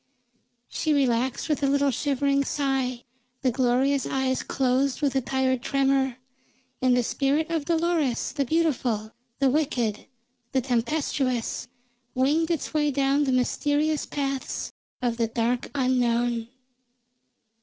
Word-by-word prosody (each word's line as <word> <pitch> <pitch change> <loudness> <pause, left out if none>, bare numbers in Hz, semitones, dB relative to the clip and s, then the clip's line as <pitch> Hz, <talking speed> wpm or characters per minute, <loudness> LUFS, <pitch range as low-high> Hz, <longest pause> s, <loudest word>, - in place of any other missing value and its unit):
She 310 -2 -1
relaxed 255 -2 +1
with 300 -1 0
a 280 - +2
little 280 0 +2
shivering 280 +1 +1
sigh, 265 -3 -1 0.4
the 255 - +3
glorious 260 +3 +1
eyes 265 -1 0
closed 260 0 0
with 285 -3 0
a 265 - +3
tired 260 0 0
tremor, 270 -1 +1 0.6
and 255 -1 +4
the 245 - +2
spirit 285 +6 0
of 320 -3 -1
Dolores 330 -6 0
the 280 0 0
beautiful, 255 -8 0 0.3
the 270 -2 +3
wicked, 245 -7 -1 0.5
the 265 - +2
tempestuous, 250 -1 -1 0.5
winged 295 +6 +2
its 330 -2 -2
way 300 -1 +2
down 280 +1 +2
the 265 - +1
mysterious 290 +4 +1
paths 275 -2 -3 0.3
of 235 -2 0
the 230 -1 +1
dark 235 +2 -1
unknown. 240 -3 +1
270 Hz, 125 wpm, -26 LUFS, 250-285 Hz, 0.6 s, and